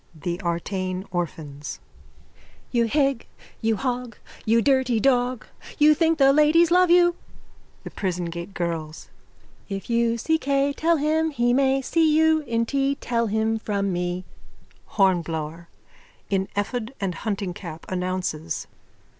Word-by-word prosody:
_ 150 Hz, -, -19 dB
THE 175 Hz, +1 st, -2 dB
ARTANE 185 Hz, +2 st, -3 dB
ORPHANS: 150 Hz, -5 st, -5 dB, 0.9 s
You 235 Hz, -2 st, +2 dB
hig, 275 Hz, -1 st, +1 dB, 0.3 s
you 225 Hz, 0 st, +2 dB
hog, 250 Hz, 0 st, -3 dB, 0.3 s
you 230 Hz, +1 st, +4 dB
dirty 260 Hz, -2 st, +2 dB
dog! 250 Hz, -1 st, +1 dB, 0.3 s
You 300 Hz, 0 st, +6 dB
think 325 Hz, +1 st, +2 dB
the 275 Hz, -2 st, +5 dB
ladies 310 Hz, +3 st, +4 dB
love 365 Hz, 0 st, +5 dB
you! 350 Hz, 0 st, +5 dB, 0.7 s
THE -, -, -8 dB
PRISON 180 Hz, -3 st, -2 dB
GATE 170 Hz, +3 st, -6 dB
GIRLS: 165 Hz, -3 st, -4 dB, 0.6 s
If 195 Hz, +3 st, -5 dB
you 235 Hz, 0 st, +2 dB
see 320 Hz, +7 st, +1 dB
Kay 280 Hz, 0 st, +1 dB
Tell 330 Hz, +3 st, +2 dB
him 315 Hz, +2 st, +1 dB
he 240 Hz, -5 st, +1 dB
may 270 Hz, 0 st, +2 dB
See 315 Hz, +1 st, +3 dB
you 320 Hz, 0 st, +4 dB
in 230 Hz, 0 st, 0 dB
tea 275 Hz, +2 st, 0 dB
Tell 235 Hz, -3 st, -1 dB
him 220 Hz, +1 st, 0 dB
from 200 Hz, -3 st, -1 dB
me. 175 Hz, +1 st, -2 dB, 0.7 s
HORNBLOWER: 170 Hz, -4 st, 0 dB, 0.6 s
_(In 190 Hz, -1 st, +1 dB
ephod 235 Hz, +4 st, -2 dB
and 195 Hz, -2 st, -2 dB
huntingcap, 180 Hz, -4 st, -5 dB
announces.) 180 Hz, -3 st, -3 dB
225 Hz, 135 wpm, -24 LUFS, 180-275 Hz, 0.9 s, You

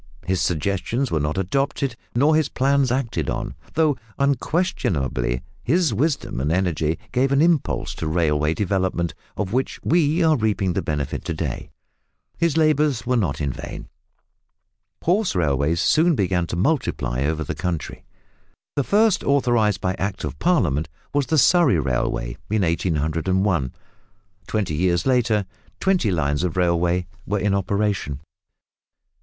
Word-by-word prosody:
His 95 Hz, +1 st, 0 dB
suggestions 100 Hz, -, -1 dB
were 80 Hz, -, +1 dB
not 75 Hz, +3 st, -1 dB
adopted 135 Hz, +6 st, -1 dB, 0.2 s
nor 145 Hz, +6 st, +4 dB
his 155 Hz, -3 st, +2 dB
plans 135 Hz, -1 st, +2 dB
acted 125 Hz, -3 st, -1 dB
on, -, -, -3 dB, 0.2 s
though 155 Hz, -3 st, +3 dB, 0.2 s
unquestionably 125 Hz, -, 0 dB, 0.2 s
his 165 Hz, -1 st, +2 dB
wisdom 140 Hz, -, -1 dB
and 75 Hz, +3 st, 0 dB
energy 85 Hz, -3 st, 0 dB
gave 130 Hz, +2 st, +1 dB
an 140 Hz, -, +3 dB
impulse 155 Hz, -, +1 dB
to 80 Hz, -, -4 dB
railway 75 Hz, -1 st, +1 dB
development, 95 Hz, -3 st, -1 dB, 0.2 s
of 105 Hz, -1 st, -2 dB
which 130 Hz, +2 st, -1 dB
we 165 Hz, +1 st, +2 dB
are 160 Hz, -1 st, +4 dB
reaping 105 Hz, -6 st, 0 dB
the -, -, 0 dB
benefit 75 Hz, -3 st, -3 dB
to -, -, -2 dB
day. -, -, -4 dB, 0.7 s
His 165 Hz, -2 st, +1 dB
labours 150 Hz, -6 st, +2 dB
were 125 Hz, +1 st, +1 dB
not 95 Hz, -, 0 dB
in 70 Hz, -4 st, -1 dB
vain. -, -, -8 dB, 1.1 s
Horse 190 Hz, -, +1 dB
railways 75 Hz, -1 st, +1 dB
soon 165 Hz, -, +3 dB
began 90 Hz, -5 st, 0 dB
to -, -, -4 dB
multiply 85 Hz, -, 0 dB
over 80 Hz, +2 st, -1 dB
the -, -, -4 dB
country. 85 Hz, -4 st, -4 dB, 0.7 s
The 140 Hz, -, +1 dB
first 210 Hz, -, +3 dB
authorised 120 Hz, -7 st, +2 dB
by 90 Hz, -, 0 dB
Act 95 Hz, +1 st, -3 dB
of -, -, -5 dB
Parliament 85 Hz, -, +1 dB, 0.2 s
was 145 Hz, -2 st, +1 dB
the 160 Hz, -, +1 dB
Surrey 150 Hz, -, +5 dB
Railway -, -, -1 dB
in 105 Hz, -1 st, +1 dB
1801. 80 Hz, -1 st, 0 dB, 0.8 s
Twenty 105 Hz, -7 st, -1 dB
years 85 Hz, +2 st, +1 dB
later 120 Hz, -6 st, +2 dB, 0.3 s
twenty 190 Hz, -, +2 dB
lines 75 Hz, -5 st, 0 dB
of 90 Hz, -1 st, -2 dB
railway 90 Hz, 0 st, +2 dB, 0.2 s
were 105 Hz, -, 0 dB
in 100 Hz, 0 st, +1 dB
operation. 100 Hz, -7 st, -1 dB
100 Hz, 140 wpm, -22 LUFS, -, 1.1 s, Surrey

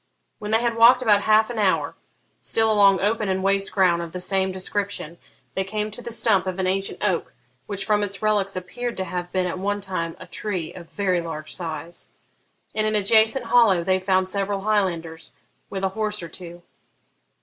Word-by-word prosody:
When 210 Hz, -1 st, -6 dB
they 220 Hz, +1 st, +3 dB
had 235 Hz, -1 st, -1 dB
walked 235 Hz, +2 st, +7 dB
about 205 Hz, -3 st, +4 dB
half 220 Hz, +2 st, +3 dB
an 230 Hz, -, -4 dB
hour, 195 Hz, -3 st, +1 dB, 0.5 s
still 225 Hz, -1 st, +1 dB
along 200 Hz, -2 st, +5 dB
open 210 Hz, 0 st, 0 dB
and 190 Hz, 0 st, -1 dB
waste 195 Hz, 0 st, +2 dB
ground 180 Hz, -3 st, +3 dB
of 170 Hz, -1 st, -7 dB
the 180 Hz, -, -4 dB
same 190 Hz, +1 st, +1 dB
description, 185 Hz, -3 st, -3 dB, 0.3 s
they 190 Hz, -, -1 dB
came 210 Hz, +2 st, -3 dB
to 220 Hz, -, -4 dB
the 240 Hz, -, -7 dB
stump 220 Hz, -5 st, +1 dB
of 185 Hz, 0 st, -3 dB
an 190 Hz, -, -1 dB
ancient 195 Hz, +2 st, -2 dB
oak, 185 Hz, -5 st, -1 dB, 0.3 s
which, 200 Hz, -1 st, -4 dB
from 210 Hz, -1 st, +2 dB
its 200 Hz, -1 st, -2 dB
relics, 205 Hz, -2 st, +1 dB
appeared 240 Hz, +6 st, -5 dB
to 190 Hz, -, -1 dB
have 180 Hz, -1 st, -5 dB
been 185 Hz, -1 st, 0 dB
at 180 Hz, +1 st, -3 dB
one 205 Hz, +2 st, -1 dB
time 185 Hz, -4 st, -4 dB
a -, -, -9 dB
tree 185 Hz, -7 st, -4 dB
of 170 Hz, -2 st, -11 dB
very 185 Hz, -4 st, 0 dB
large 155 Hz, -2 st, -6 dB
size. 170 Hz, 0 st, -6 dB, 0.6 s
In 215 Hz, 0 st, 0 dB
an 215 Hz, -, 0 dB
adjacent 220 Hz, +4 st, +4 dB
hollow 225 Hz, -7 st, +4 dB
they 185 Hz, +1 st, +1 dB
found 185 Hz, 0 st, +1 dB
several 200 Hz, 0 st, -1 dB
Highlanders, 175 Hz, -6 st, -1 dB, 0.4 s
with 195 Hz, 0 st, -5 dB
a 190 Hz, -, +2 dB
horse 210 Hz, -1 st, -3 dB
or 170 Hz, -, -7 dB
two. 175 Hz, +1 st, -9 dB
195 Hz, 195 wpm, -23 LUFS, 185-215 Hz, 0.6 s, walked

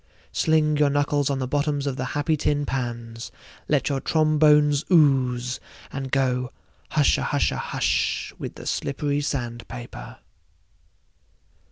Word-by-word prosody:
Sling 155 Hz, -1 st, +2 dB
your 145 Hz, -1 st, +4 dB
knuckles 145 Hz, 0 st, +1 dB
on 140 Hz, -, 0 dB
the 130 Hz, -1 st, -2 dB
bottoms 145 Hz, +1 st, 0 dB
of 140 Hz, -2 st, -1 dB
the 130 Hz, -, -3 dB
happy 155 Hz, +2 st, +1 dB
tin 145 Hz, -1 st, 0 dB
pans, 120 Hz, -3 st, -4 dB, 0.4 s
let 145 Hz, -4 st, +1 dB
your 140 Hz, -2 st, 0 dB
trombones 150 Hz, -2 st, +4 dB
ooze, 130 Hz, -6 st, +3 dB, 0.3 s
and 135 Hz, -1 st, -4 dB
go 125 Hz, -2 st, 0 dB, 0.4 s
hushahusha -, -, +2 dB
hush -, -, -1 dB
with -, -, -6 dB
the -, -, -10 dB
slippery 145 Hz, 0 st, -1 dB
sand 120 Hz, -5 st, -3 dB
paper. -, -, -9 dB
140 Hz, 125 wpm, -24 LUFS, 125-150 Hz, 0.4 s, your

